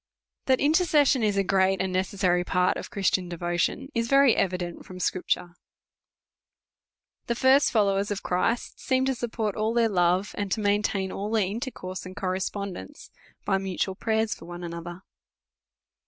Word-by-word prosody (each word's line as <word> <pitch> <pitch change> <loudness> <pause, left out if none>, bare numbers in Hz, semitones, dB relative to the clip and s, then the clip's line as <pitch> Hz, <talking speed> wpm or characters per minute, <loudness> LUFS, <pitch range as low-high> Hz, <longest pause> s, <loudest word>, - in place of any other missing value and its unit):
THAT 260 -1 +4
intercession 295 -4 +3
is 210 -2 +1
a 195 - +3
great 190 0 +2
and 190 -1 -1
necessary 185 -1 +1
part 180 0 +1
of - - -6
Christian 190 -2 0
devotion, 175 +9 -2
is 230 0 0
very 275 -2 +5
evident 180 -2 -2
from 185 -1 -10
Scripture. 180 -1 -1 1.7
The 235 - 0
first 265 +4 +4
followers 200 -2 +2
of 205 -2 -3
Christ 225 +7 -1
seem 260 0 +1
to 265 - +1
support 225 -4 -3
all 220 +1 -1
their 230 -1 +3
love, 180 +1 +1
and 205 -2 -3
to - - -2
maintain 205 -2 0
all 205 +2 -4
their 220 -3 +2
intercourse 195 -3 -5
and 185 0 -9
correspondence, 190 - -4 0.3
by 195 - +2
mutual 190 0 -2
prayers 220 +2 0
for - - -12
one 175 +1 -8
another. 175 +1 -7
195 Hz, 155 wpm, -26 LUFS, 185-225 Hz, 1.7 s, very